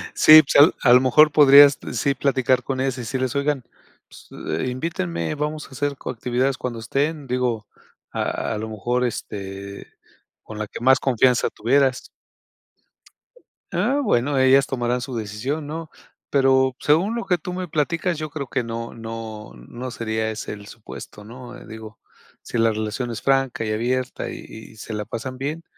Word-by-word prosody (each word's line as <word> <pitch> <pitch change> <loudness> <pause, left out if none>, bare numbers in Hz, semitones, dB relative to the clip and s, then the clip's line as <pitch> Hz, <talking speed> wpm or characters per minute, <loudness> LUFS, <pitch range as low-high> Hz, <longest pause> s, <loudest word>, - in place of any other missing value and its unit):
Sí, 155 0 +9
pues, 145 +2 +6
a 120 - +6
a - - +8
lo 125 - +7
mejor 150 +4 +5
podrías, 145 -1 +8 0.2
sí 140 - +1
platicar 130 -2 +1
con 135 -1 -3
ellas, 130 -1 -1
y - - -5
decirles: 130 +3 -3
"Oigan, 140 -2 0 0.4
pues, - - -16 0.3
eh, - - -1
invítenme, 90 - -3
vamos 150 +1 -4
a - - -23
hacer 140 +1 -3
co - - -7
actividades 125 +2 -1
cuando 120 -2 -5
estén", 140 +6 -2
digo, 125 -3 -1 0.4
a - - -2
a - - -3
lo 110 +1 -5
mejor, 120 +4 -1
este, 100 -3 -6 0.5
con 110 - -10
la 105 - -3
que - - -9
más 130 +2 +4
confianza 125 -1 +2
tuvieras. 130 +3 +1 1.6
Ah, 285 +1 +1
bueno, 140 - +1
ellas 130 +1 +5
tomarán 125 -1 -1
su 130 0 -6
decisión, 115 +8 -4
¿no? 160 +1 -6 0.4
Pero, 130 -1 +3
según 175 +10 +2
lo 235 - -3
que 180 -2 +1
tú 180 +3 -6
me 185 0 -4
platicas, 165 +3 -1
yo 155 0 -5
creo 140 -2 -6
que 125 -1 -2
no 115 0 -6
no 115 - -8
no 120 - -8
sería 110 -1 -2
ese 110 - -6
el 100 -1 -11
supuesto, 105 -1 -11
¿no? 120 +3 -11
Digo, 110 0 -11 0.4
si - - -5
la 115 0 +3
relación 110 +3 -3
es 115 - -6
franca 135 -4 +1
y 110 - -2
abierta, 125 +3 -2
y - - -7 0.4
y - - -19
se 110 +1 -8
la 105 -1 -4
pasan 130 +3 -6
bien, 150 +5 -4
130 Hz, 175 wpm, -22 LUFS, 115-140 Hz, 1.6 s, Sí